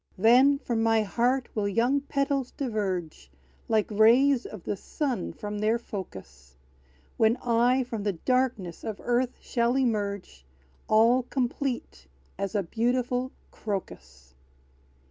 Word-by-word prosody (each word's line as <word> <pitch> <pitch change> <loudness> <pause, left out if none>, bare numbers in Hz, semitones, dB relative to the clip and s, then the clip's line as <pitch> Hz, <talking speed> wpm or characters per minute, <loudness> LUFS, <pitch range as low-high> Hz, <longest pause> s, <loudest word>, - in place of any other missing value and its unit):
Then 250 +7 +5
from 235 -5 -2
my 225 -1 +3
heart 240 +6 0
will 210 -2 -1
young 240 +8 +1
petals 275 -2 -1
diverge, 190 - -4 0.4
Like 215 -1 +1
rays 240 +5 +4
of 210 -5 -10
the - - -2
sun 250 - -3
from 210 0 -6
their 215 +2 +2
focus; 70 - -9 0.6
When 225 +2 +3
I 245 +2 +2
from 230 -3 -5
the 200 -1 -1
darkness 235 -3 -1
of 215 -2 -5
earth 245 +1 0
shall 235 +1 0
emerge, 205 - -2 0.4
All 230 +4 +4
complete, 250 - -3 0.3
as 195 +2 -3
a 200 - +1
beautiful 245 +5 -1 0.2
CROCUS! 65 - -7
230 Hz, 125 wpm, -27 LUFS, 200-250 Hz, 0.6 s, Then